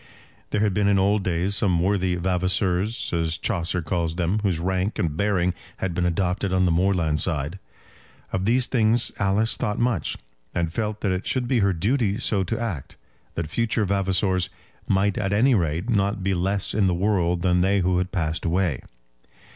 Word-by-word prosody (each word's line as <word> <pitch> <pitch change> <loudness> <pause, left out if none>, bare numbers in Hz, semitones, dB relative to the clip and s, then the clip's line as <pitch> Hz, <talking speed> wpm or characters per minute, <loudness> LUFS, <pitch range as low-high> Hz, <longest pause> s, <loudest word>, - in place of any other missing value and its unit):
There 105 - 0
had 105 -3 +2
been 100 +1 +1
in 100 -1 +3
old 100 +1 +2
days 90 +2 0
some 95 -5 +2
worthy 95 0 +1
Vavaseurs, 95 +4 0
as 85 -1 0
Chaucer 90 -4 -1
calls 85 0 -1
them, 90 +4 0
whose 100 -5 0
rank 95 +4 -1
and 80 -3 -1
bearing 90 -2 +1 0.2
had 95 -2 -2
been 90 +1 0
adopted 90 +2 -1
on 95 0 +2
the 90 - +2
moorland 85 -3 +1
side. 80 +2 -2 0.7
Of 95 0 -1
these 120 +3 +3
things 115 -2 +2
Alice 100 +3 +1
thought 105 +1 -2
much, 120 -7 0 0.4
and 85 -2 -1
felt 105 0 -3
that 100 - 0
it 95 +1 -3
should 125 -2 0
be 125 -1 +2
her 100 -2 +3
duty 105 +4 0
so 105 -5 +1
to 115 +6 -2
act, 100 - -5 0.4
that 80 -2 -4
future 115 0 0
Vavasors 95 -2 +1 0.4
might 100 +1 +1
at 100 -1 -1
any 125 +6 +4
rate 85 -1 0
not 100 -3 0
be 95 0 +1
less 95 +2 -1
in 100 -3 +2
the 90 - +1
world 90 -3 +1
than 90 -1 +3
they 95 +1 +2
who 90 0 +1
had 90 +1 -2
passed 80 -4 -2
away. 85 -4 0
95 Hz, 185 wpm, -24 LUFS, 90-105 Hz, 0.7 s, any